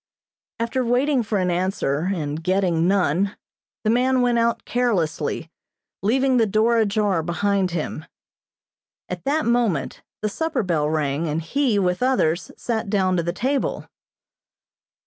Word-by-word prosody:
After 235 +3 -1
waiting 255 +3 +2
for 210 -2 -1
an 180 -2 +1
answer, 175 -3 -1
and 155 -3 -3
getting 180 -2 +1
none, 195 0 +1 0.5
the 215 - +2
man 255 +1 +2
went 240 -1 +2
out 230 0 0
carelessly, 170 -9 -1 0.5
leaving 260 +5 +2
the 225 -2 +3
door 225 +3 +3
ajar 205 -4 +1
behind 190 +3 0
him. 160 -2 -4 1.0
At - - -6
that 300 +3 +1
moment 235 - 0 0.2
the - - +2
supper 305 +1 -1
bell 160 -5 0
rang 155 0 -1
and 155 +1 -1
he, 240 - 0
with 180 0 0
others, 195 -10 +1
sat 220 -3 -2
down 190 -2 +2
to - - +2
the 170 +1 -2
table. 260 +9 -1
200 Hz, 140 wpm, -22 LUFS, 170-240 Hz, 1.0 s, the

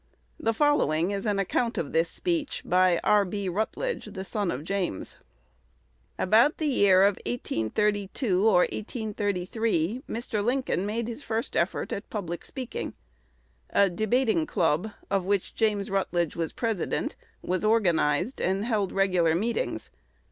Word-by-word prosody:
The 225 - +1
following 200 - +2
is 200 +2 -3
an 205 -1 +1
account 230 +5 0
of 150 - -3
this 165 +1 +2
speech 330 - -2
by 180 -1 +4
R. 210 -1 +5
B. 200 +1 -3
Rutledge, 220 - -2
the 190 - -6
son 205 -1 -2
of 135 -1 -3
James: 180 - -3 1.0
"About 225 +10 +4
the 315 - -2
year 200 -9 +5
1832 205 - 0
or 185 -5 +5
1833, 210 -1 -1
Mr. 220 -2 -2
Lincoln 240 -6 0
made 225 +2 -2
his 240 +4 -6
first 225 0 -3
effort 170 - 0
at 200 - -6
public 175 -5 -4
speaking. 255 -3 -6 0.7
A 200 -2 +3
debating 245 - +1
club, 180 - +1 0.2
of 195 -2 +2
which 200 0 -1
James 210 -3 0
Rutledge 175 -4 0
was 165 -1 -2
president, 225 -6 -2 0.3
was 185 +2 -1
organized, 195 - +2
and 195 +3 0
held 210 -5 0
regular 180 -4 +2
meetings. 235 - -2
205 Hz, 135 wpm, -27 LUFS, 180-225 Hz, 1.0 s, R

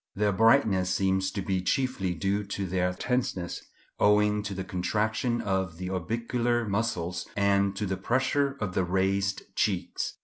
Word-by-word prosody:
Their 105 0 +2
brightness 110 -3 +4
seems 95 0 +1
to 100 0 -4
be 95 -1 0
chiefly 95 -3 0
due 100 +5 0
to 100 -1 -4
their 90 0 0
tenseness, 95 -4 -2 0.4
owing 105 0 +4
to 100 -1 -5
the 95 - -3
contraction 110 +6 -1
of 95 -4 -1
the 90 +1 -4
orbicular 115 +5 -1
muscles 100 -4 -2
and 100 0 +2
to 105 - -2
the 95 -1 -2
pressure 135 +6 +1
of 105 -4 -3
the 95 - +1
raised 95 +2 0
cheeks. - - -1
100 Hz, 150 wpm, -28 LUFS, 95-110 Hz, 0.4 s, brightness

